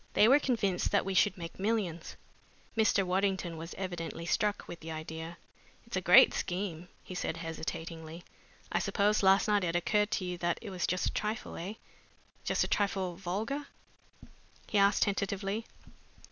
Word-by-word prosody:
They 210 - +6
were 275 +4 +7
convinced 220 -10 0
that - - +2
we 195 - -1
should 195 +2 +3
make 170 0 -8
millions." 195 -5 -1 0.6
Mr. 215 -3 +3
Waddington 185 -2 0
was 165 +2 -7
evidently 175 -3 -5
struck 210 +3 0
with 170 - -8
the 160 +1 -7
idea. 160 +2 -6 0.5
"It's - - -6
a - - 0
great - - +8
scheme," 180 -2 -3 0.2
he - - -8
said 170 -2 -2
hesitatingly. 165 0 -6 0.5
"I - - +2
suppose 210 +1 +2
last 195 0 +5
night 205 -2 +3
it 170 -1 -1
occurred 210 +4 +2
to 185 - -1
you 180 -1 -4
that 175 0 0
it 215 -4 -8
was 180 -2 -1
just 180 +1 0
a - - 0
trifle 215 +1 -3
eh? 190 +6 -5 0.7
just - - +1
a - - -1
trifle 195 -3 0
vulgar?" 215 +11 -3 1.0
he 210 - +1
asked 200 +1 +4
tentatively. 200 +2 -2
190 Hz, 165 wpm, -31 LUFS, 170-205 Hz, 1.0 s, great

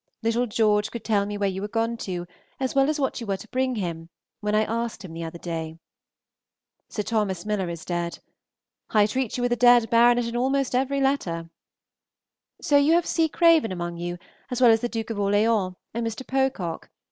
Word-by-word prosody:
Little 230 +2 +1
George 210 -1 +2
could 235 - -7
tell 205 -2 +1
me 205 0 -4
where 200 -1 +1
you 190 0 -3
were 205 - -3
gone 230 +2 -1
to, 180 -5 -4 0.3
as 260 -1 -1
well 275 +1 +3
as 305 0 -1
what 270 -2 -1
you 230 - -6
were 195 -1 0
to 225 - -12
bring 255 0 0
him, 170 -5 -4 0.3
when 210 0 -1
I 215 - +4
asked 230 -2 -3
him 165 - -9
the 165 0 -5
other 165 +1 -6
day. 165 -2 -5 1.1
Sir 210 - -3
Tho. 220 0 +1
Miller 190 0 -2
is 170 -2 -7
dead. 175 -1 -3 0.7
I 210 -2 +4
treat 250 +3 -2
you 245 - -2
with 245 - +1
a - - +2
dead 240 -1 +5
baronet 240 +1 +5
in 235 0 -4
almost 270 +2 0
every 270 +2 +1
letter. 170 -12 -1 1.1
So 290 - +4
you 285 +3 +4
have 345 0 +3
C. 325 -1 +1
Craven 330 - +4
among 175 -1 -4
you, 175 +1 -4 0.3
as 250 -2 -2
well 245 -2 +7
as 225 0 +3
the 240 - -1
Duke 225 -1 -4
of 210 - -4
Orleans 205 -1 +2 0.2
and 230 0 -2
Mr. 225 +3 -5
Pocock. 265 -11 -1
225 Hz, 205 wpm, -25 LUFS, 190-250 Hz, 1.1 s, well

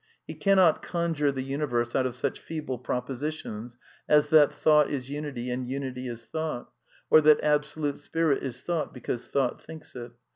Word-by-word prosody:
He - - -6
cannot 190 -5 +4
conjure 165 -4 0
the 130 -1 -4
universe 130 -4 -1
out 130 -1 +2
of 125 - -6
such 125 - -2
feeble 150 -6 -5
propositions 125 -2 -4 0.3
as 150 -1 +5
that 150 -2 +6
Thought 150 -2 +4
is 135 -2 -4
unity 140 -4 -4
and 125 0 -3
Unity 130 -1 -4
is 115 -1 -7
thought, 155 +1 -4 0.4
or 155 - +8
that 150 0 +5
Absolute 150 -1 0
Spirit 155 0 0
is 125 -2 -5
Thought 170 -5 -2
be - - -8
cause 120 +1 -4
Thought 135 -3 0
thinks 160 -3 -11
it. 120 -1 -8
140 Hz, 175 wpm, -27 LUFS, 125-155 Hz, 0.4 s, or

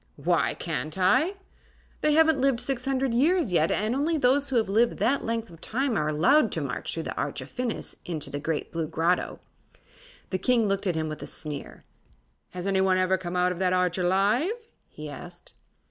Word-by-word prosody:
"Why - - +1
can't 155 +7 -4
I?" 260 - +3 0.7
"They 305 - +3
haven't 320 -3 +4
lived 270 -3 +2
six 255 -1 -2
hundred 270 -2 0
years 305 - +2
yet, 165 -2 +3
and 215 +3 0
only 305 +5 +1
those 275 +1 +2
who 265 - -2
have 225 -3 +2
lived 225 +4 +2
that 245 +7 +1
length 230 -2 -3
of 165 -1 -15
time 260 +4 -1
are 150 -6 0
allowed 250 - +4
to - - -1
march - - -3
through - - -3
the - - -4
Arch - - -2
of - - -9
Phinis 250 -3 -3
into 155 -4 -4
the 145 - -3
Great 155 +1 -3
Blue 165 -2 -2
Grotto." 165 +4 0 0.9
The 185 - -1
King 240 -2 +2
looked 195 0 -1
at 175 - 0
him 160 0 -1
with 155 0 -6
a - - -5
sneer. 150 -3 -5 0.7
"Has 180 0 -7
anyone 190 -1 +2
ever 185 0 +2
come 180 -1 -5
out 180 0 +2
of 180 - -5
that 185 -1 +2
Arch 180 0 +1
alive?" 220 - +1 0.2
he 150 0 -9
asked. 175 +4 -10
195 Hz, 200 wpm, -26 LUFS, 175-265 Hz, 0.9 s, haven't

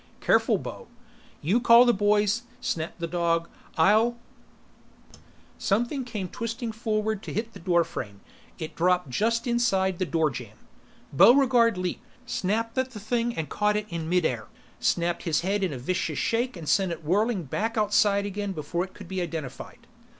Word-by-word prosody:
"Careful, - - +3
Bo!" - - -8 0.6
"You 190 +11 +3
call 235 0 +7
the 240 - +4
boys," 205 +2 +2 0.2
snapped 165 -6 -3
the 170 - -2
dog. 170 -1 0 0.3
"I'll 220 +8 +4 0.7
" - - -30 0.7
Something 240 +7 0
came 210 -6 -4
twisting 230 +3 -4
forward 220 -2 -1
to - - -7
hit 230 +1 -3
the - - -10
doorframe, 165 - -1 0.4
it 160 -3 -6
dropped 180 -4 +1
just 230 - 0
inside 195 -7 +1
the 185 - 0
doorjamb. 130 -10 -2 0.6
Buregarde 235 - +5
leaped, 180 -1 -3 0.2
snapped 230 0 -1
at 260 0 0
the 220 - -9
thing 235 +3 -1
and 160 -2 -2
caught 210 0 +1
it 210 - -3
in 165 -2 -4
midair, 160 -11 0 0.3
snapped 170 0 0
his 160 -3 0
head 195 +3 0
in 185 - 0
a 135 - -5
vicious 155 +3 -2
shake 235 -1 0
and 160 -3 -8
sent 190 +5 +2
it 165 -1 -6
whirling 205 +3 +1
back 220 - -2
outside 205 -1 +3
again 205 0 -3
before 170 +2 -2
it 190 - -10
could 200 - -11
be 190 0 -3
identified. 165 - -6
195 Hz, 165 wpm, -26 LUFS, 170-230 Hz, 0.7 s, call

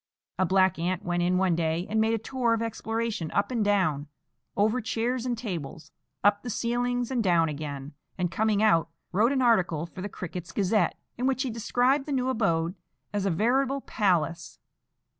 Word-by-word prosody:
A 185 - +3
black 190 -2 +3
ant 180 +1 -2
went 175 0 0
in 180 +1 +2
one 185 -2 +2
day 165 +1 0
and 220 +1 +1
made 225 +1 +2
a - - 0
tour 235 +1 0
of 225 - -3
exploration 225 -5 -3
up 200 - +1
and 235 -4 +1
down, 185 -8 +1 0.5
over 215 +5 +2
chairs 235 +3 -1
and 240 -1 -1
tables, 170 - -6 0.3
up 205 +1 +4
the 245 - -6
ceilings 245 +2 -1
and 245 -3 +1
down 170 -4 +3
again, 145 -1 -6 0.2
and, 180 -2 -1
coming 215 +2 +1
out, 165 -7 +4 0.2
wrote 215 +7 +3
an 265 -2 +1
article 180 -9 +2
for 180 +2 -10
the 205 - -4
Crickets' 180 -2 -7
Gazette, 205 +1 +1 0.2
in 255 - +1
which 265 0 +1
he 260 - -2
described 250 +5 +1
the 290 - -2
new 260 -1 0
abode 170 -8 +1 0.4
as 200 -1 0
a - - +2
veritable 260 +9 +1
palace. 175 - 0
205 Hz, 185 wpm, -27 LUFS, 175-235 Hz, 0.5 s, up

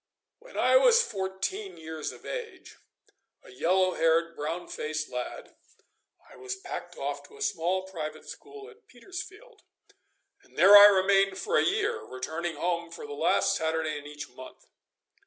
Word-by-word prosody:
When - - -13
I - - +5
was 485 -1 +5
fourteen 195 - -4
years 160 -1 -6
of - - -15
age, 475 -2 -7 0.7
a - - -15
yellow 185 +7 +2
haired, 165 +1 +1
brown 160 +4 -4
faced 155 0 -4
lad, 125 0 -6 0.7
I - - -16
was 395 -1 -5
packed 390 - -8
off - - -4
to 430 - -17
a - - -14
small 185 - -1
private 160 -5 -7
school 415 0 -11
at 455 0 -18
Petersfield, 405 - -10 0.8
and 395 - -24
there 195 +3 +8
I 205 0 +12
remained 195 0 +3
for 455 - -2
a - - +4
year, 430 +4 0
returning 160 +6 -5
home 170 +2 -2
for 445 - -9
the 440 - -7
last - - +2
Saturday 160 -1 -1
in 145 0 -8
each 150 0 -8
month. 130 +1 -13
190 Hz, 155 wpm, -28 LUFS, -, 0.8 s, I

